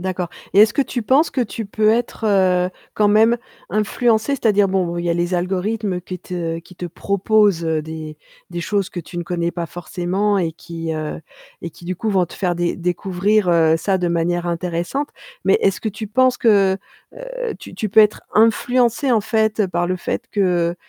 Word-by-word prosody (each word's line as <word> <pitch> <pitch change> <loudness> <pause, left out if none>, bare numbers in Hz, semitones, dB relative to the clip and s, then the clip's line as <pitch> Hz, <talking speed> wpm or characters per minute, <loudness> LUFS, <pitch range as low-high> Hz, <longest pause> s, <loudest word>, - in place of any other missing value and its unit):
D'accord 180 -1 -3 0.2
et 200 - +3
est-ce 210 0 +5
que 280 - +3
tu 245 -2 -4
penses 275 +8 +3
que 260 - -1
tu 225 -1 -3
peux 215 +1 +1
être, 230 0 -1
heu, 185 -3 +3 0.3
quand 210 - +3
même 220 +3 +4 0.3
influencé? 220 +3 +1
C'est-à-dire, 210 -7 +3
bon, 185 -3 -1
il 170 - -3
y 170 - +1
a - - +1
les 175 +1 -1
algorithmes 190 +2 -1
qui 180 +1 -7
te 165 -2 -4
qui 180 +2 -15
te 175 - -5
proposent 200 +1 +1
des 155 -1 -4 0.3
des 175 0 -4
choses 195 +1 -1
que - - -6
tu 175 +1 -8
ne - - -2
connais 170 0 -2
pas 170 -1 -4
forcément 185 +4 -1
et 175 -4 0
qui, 165 0 -6
heu 155 0 -4 0.4
et 170 - -5
qui, 170 - -16
du 185 +1 -3
coup, 215 +5 -2
vont 185 -3 +2
te - - -12
faire 180 -3 -1
dé 175 0 0
découvrir, 185 +3 0
heu, 165 -2 +4
ça 190 +4 0
de 180 -2 -1
manière 175 +1 0
intéressante. 175 - -2 0.3
Mais - - +4
est-ce 195 - +1
que 220 - -2
tu 215 +1 -6
penses 255 +3 +3
que, 200 -4 +4 0.4
heu, - - -5
tu - - -10
tu 215 - -2
peux 215 +3 +6
être 210 -1 +3
influencé, 240 +4 +3
en 225 - +4
fait, 220 0 +1
par 175 0 -1
le 185 - 0
fait 210 +5 -3
que, 175 -4 +1
190 Hz, 200 wpm, -20 LUFS, 175-215 Hz, 0.4 s, peux